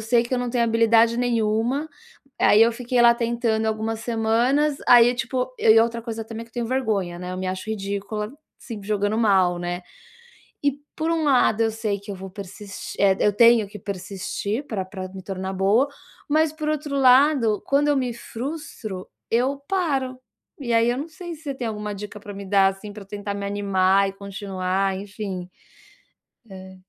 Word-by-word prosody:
sei 235 +2 +3
que 240 +2 -8
eu - - 0
não 245 -1 -2
tenho 240 -1 +1
habilidade 230 0 +4
nenhuma, 240 +4 0 0.5
aí, 210 - +6
eu 230 - +5
fiquei 245 +1 -1
lá 235 0 +7
tentando 235 -2 0
algumas 220 0 -2
semanas, 240 +6 +1
aí, 245 0 +7
tipo 255 +1 -2
eu 220 - +6
e 225 - +7
outra 230 0 0
coisa 225 -1 -5
também 225 +1 -7
que 230 - -22
eu - - -35
tenho 240 -1 -2
vergonha, 215 -9 -1
né, 180 0 -6
eu - - -4
me 185 - -3
acho 185 +4 -4
ridícula, 205 +1 -3 0.3
se 230 -4 -8
jogando 205 +1 0
mal, 190 -5 +3
né? 175 +1 -4 0.8
E 285 - +3 0.2
por 320 +1 -1
um 325 -2 +1
lado 245 -5 +3
eu 225 - +2
sei 215 -2 -2
que 200 +1 -10
eu 200 - -4
vou 190 0 -8
persis 200 +1 -8
eh, 195 -1 +4
eu 210 - +4
tenho 230 -1 +6
que 210 - -10
persistir, 200 +5 -4
pra 200 -7 -3
pra 185 -1 -7
me 190 0 -10
tornar 190 0 -4
boa, 200 +8 +3 0.4
mas 310 +1 +2
por 310 -1 -4
outro 295 -2 -2
lado, 255 -4 +4
quando 285 +1 +2
eu 290 - +3
me 250 -2 0
frustro, 235 - -6 0.2
eu 260 +4 +1
paro. 275 -9 0 0.4
E 240 -4 -2
aí, 230 0 +4
eu 245 - -1
não 300 +4 -4
sei 345 +1 -8
se 315 - -15
você 280 -3 -4
tem 250 -3 -4
alguma 210 -1 -4
dica 210 +1 -8
pra 205 - -9
me 200 0 -8
dar, 195 0 +4
assim, 195 +2 -7
pra 210 -1 -9
eu - - -15
tentar 205 0 -5
me 200 - -4
animar 195 -1 +2
e - - -5
continuar 195 -1 -2
enfim 195 -2 -6 1.0
É. 190 0 -10
220 Hz, 195 wpm, -23 LUFS, 200-245 Hz, 1.0 s, lá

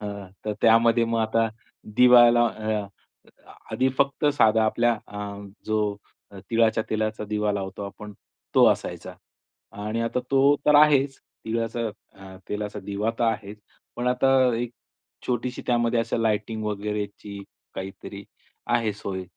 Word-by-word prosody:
अ, 105 - -6 0.4
तर 105 - -1
त्यामध्ये 115 +1 +5
मग 115 0 -1
आता 115 +1 +1 0.5
दिवाला 120 -1 +7
अ, 110 -2 -3 0.8
आधी 130 +1 +1
फक्त 140 +2 +1
साधा 110 0 +4
आपल्या 120 +2 +2
अ, 105 -1 -7 0.3
जो 105 -1 0 0.5
तिळाच्या 115 -1 +2
तेलाचा 110 0 -2
दिवा 105 0 -1
लावतो 95 0 -5
आपण 105 +1 -10 0.4
तो - - +6
असायचा. - - -4 0.6
आणि 105 +3 -4
आता 115 +2 -1
तो 140 +1 +4
तर 150 - +5
आहेच 145 -2 +5 0.3
तिळाचा 115 +1 -2 0.3
अ, 95 -1 -12
तेलाचा 105 0 -4
दिवा 100 +3 -2
तर 120 - +2
आहेच. 105 -2 -2 0.4
पण 120 - -3
आता 135 +2 +2 0.2
एक 120 0 -3 0.6
छोटीशी 125 +1 -2
त्यामध्ये 120 -1 +2 0.2
लाइटिंग 110 0 -1
वगैरेची 105 -1 -4 0.3
काहीतरी 95 +1 -8 0.5
आहे 115 -3 +1
सोय. 100 -2 -5
110 Hz, 125 wpm, -25 LUFS, 105-120 Hz, 0.8 s, दिवाला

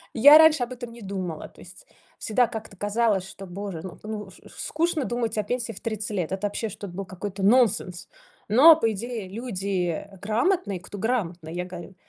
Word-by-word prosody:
Я 285 +6 +9
раньше 315 -4 +6
об 245 +1 -5
этом 240 -1 -8
не 235 - -12
думала, 185 -5 -5
то - - -22
есть - - -15 0.3
всегда 245 +3 +2
как-то 220 -3 -8
казалось, 205 -1 +1
что 195 0 -10
боже, 190 -2 -6
ну 185 -2 -9
ну 210 -2 -6
чт - - -18
скучно 320 -2 -1
думать 235 -2 -2
о 210 - +1
пенсии 240 +2 -2
в 205 - -10
30 215 -1 -4
лет. 185 -4 -2
Это, 195 +2 -1
вообще, 220 +2 -3
что-то 195 -2 -8
был 195 +1 -5
какой-то 190 +1 -6
нонсенс. 200 -6 +2 0.4
Но, 280 +10 +8
по 225 -8 +1
идее, 225 0 -5
люди 195 -6 -3
грамотные, 220 - 0
кто 200 +3 -10
грамотный, 180 -8 -2
я 180 0 -3
говорю. 180 0 -9
210 Hz, 190 wpm, -25 LUFS, 190-240 Hz, 0.4 s, Я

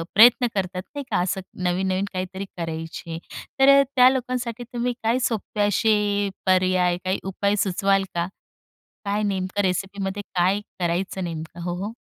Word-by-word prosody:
प्रयत्न 240 +3 +7
करतात 185 -1 -2
नाही 285 - -3
का, - - +2
असं 190 +2 -1 0.2
नवीन-नवीन 185 +2 0
काहीतरी 185 +1 -4
करायचे, 165 0 -5 0.4
तर 270 +1 +7
अ, - - +6
त्या 255 -1 +8
लोकांसाठी 250 -2 -2
तुम्ही 245 +1 0
काय 230 +3 +2
सोपे 215 -2 -3
असे 205 -1 +2 0.2
पर्याय 185 -1 +3
काय 185 +1 +1
उपाय 200 +2 0
सुचवाल 195 +1 +2
का? 170 0 0 0.8
काय 205 +1 0
नेमकं 195 0 -1
रेसिपीमध्ये 195 +1 -2
काय 185 +3 +2 0.2
करायचं 180 +2 -1
नेमकं? 165 0 -6
हो, 175 0 -2
हो. 215 +2 -5
195 Hz, 145 wpm, -24 LUFS, 180-210 Hz, 0.8 s, त्या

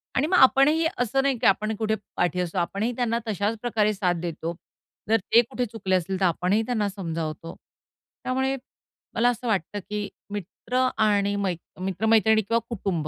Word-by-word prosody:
आणि 275 +3 +2
मग 365 +2 +3
आपणही 280 +4 +5
असं 245 +3 +1
नाही 275 -2 +1
की 245 - -2
आपण 215 +3 +2
कुठे 220 0 0 0.2
पाठी 180 +1 +1
असू, 180 +1 -4
आपणही 200 +6 0
त्यांना 235 -1 0
तशाच 210 +1 -1
प्रकारे 220 -3 +1
साथ 185 -3 0
देतो. 170 0 -4 0.5
जर 225 - +5 0.2
ते 235 - +9
कुठे 250 - -2
चुकले 205 -4 -1
असतील 185 +1 -1
तर 190 - +3
आपणही 180 +4 +2
त्यांना 220 -4 0
समजावतो. 165 -4 -5 0.7
त्यामुळे 265 +1 0 0.6
मला 240 +1 +4
असं 245 0 -3
वाटतं 205 -1 -1
की 210 -1 -2 0.2
मित्र 225 +6 -1
आणि 205 -2 +2
मै 200 -2 0 0.3
मित्रमैत्रिणी 220 +3 +3
किंवा 230 +3 +1
कुटुंब. 185 -8 -2
210 Hz, 165 wpm, -25 LUFS, 185-235 Hz, 0.7 s, ते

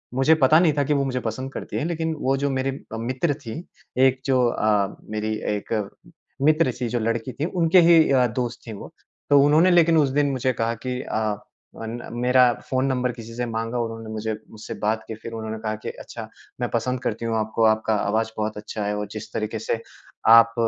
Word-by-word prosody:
मुझे 135 +5 +5
पता 155 +5 +6
नहीं 165 -4 +4
था 145 - +3
कि 150 - +1
वो 140 -1 +2
मुझे 130 -1 -1
पसंद 130 +3 -4
करती - - -6
है - - -1
लेकिन 160 -1 -1
वो 135 +1 +1
जो 140 +1 0
मेरे 135 0 -1 0.2
अ, 110 - -3
मित्र 130 +7 -1
थीं 115 +9 -5 0.5
एक 130 0 -1
जो 130 -2 +3
अ, 105 -3 +1
मेरी 110 0 -2 0.2
एक 105 +2 -5 0.7
मित्र 155 -2 +4
थी 120 - 0
जो 120 +1 -1
लड़की 115 +2 -1
थी 145 - -2
उनके 175 0 +4
ही 165 -4 +6
अ, 125 -2 +4
दोस्त 120 +1 -3
थी 110 - -5
वो। 100 - -10 0.4
तो 145 - +7
उन्होंने 155 +5 +5
लेकिन 165 -2 +5
उस 145 -3 +4
दिन 145 +1 +2
मुझे 130 -1 0
कहा 115 0 -1
कि 125 0 -2
अ, - - -3 0.7
अन 115 +2 -4 0.2
मेरा 125 0 +5 0.2
फ़ोन 130 0 +1
नंबर 125 -2 0
किसी 115 -1 -10
से 125 - -2
माँगा 115 +1 -3
उन्होंने 115 -1 -4
मुझे 110 0 -2 0.2
मुझसे 110 0 -8
बात 110 +1 +1
करके 110 - -8
फिर 115 - -7
उन्होंने 110 0 -4
कहा 110 -1 -2
कि - - -3
अच्छा - - -8 0.3
मैं 120 - 0
पसंद 125 +2 -1
करती 115 +1 -2
हूँ 115 -1 0
आपको। 110 +1 0
आपका 110 0 +2
आवाज़ 110 +2 0
बहुत 110 0 -2
अच्छा 105 0 -5
है 105 - -1
और 105 - -3
जिस 110 0 -7
तरीके 110 0 -2
से 115 +1 -2 0.5
आप 115 0 +8
120 Hz, 215 wpm, -24 LUFS, 110-135 Hz, 0.7 s, आप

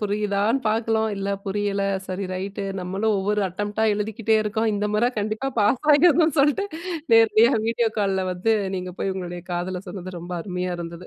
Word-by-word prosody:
புரியுதான்னு 210 +3 0
பார்க்கணும். 220 0 +1
இல்ல 195 0 -3 0.2
புரியல 200 0 -1 0.2
சரி 190 +1 -4
ரைட்டு, 195 +2 -4 0.2
நம்மளும் 195 +4 -1
ஒவ்வொரு 210 +2 0
அட்டம்ப்ட்டா 205 +4 -2
எழுதிக்கிட்டே 220 +1 0
இருக்கோம். 220 +2 0
இந்த 205 +1 -1
முறை 225 +3 +3
கண்டிப்பா 215 +6 -2
பாஸ் 210 +7 +2
ஆகிறணும்னு 315 0 +4
சொல்லிட்டு, 295 +8 +2 0.5
நேரடியா 225 +2 +5
வீடியோ 230 0 +1
கால்ல 195 -2 +1
வந்து 180 +5 +1 0.2
நீங்க 180 0 -5
போய் 195 - 0
உங்களுடைய 175 -2 -6
காதல 180 +1 -3
சொன்னது 185 -1 -7
ரொம்ப 175 +1 -8
அருமையா 180 -1 -3
இருந்தது. 170 +1 -7
205 Hz, 155 wpm, -23 LUFS, 185-220 Hz, 0.5 s, நேரடியா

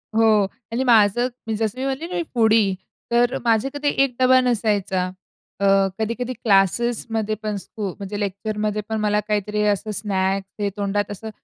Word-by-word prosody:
हो 220 -2 +5 0.3
आणि 255 - 0
माझं 235 0 +4 0.2
मी 220 - -1
जसं 220 +3 -2
मी 265 - -2
म्हटले 275 +5 -3
ना 360 - -6
मी 340 - 0
फूडी, 220 -4 +3 0.4
तर 240 +1 +3
माझे 230 +3 +2
कधी 290 0 0
1 255 -3 -2
डबा 255 0 +6
नसायचा. 205 -6 0 0.5
अ, 200 - +1 0.3
कधी-कधी 235 +3 -2
क्लासेसमध्ये 220 +1 +1
पण 210 -1 -2
स्कु 200 +3 -6
म्हणजे 205 +1 -5
लेक्चरमध्ये 210 +1 -2
पण 220 - -1
मला 210 0 +2
काहीतरी 210 0 -1
असं 215 +2 -5
स्नॅक्स 195 -1 -1
हे 205 - +1
तोंडात 205 0 -1
असं 220 +2 -7
215 Hz, 165 wpm, -22 LUFS, 205-235 Hz, 0.5 s, डबा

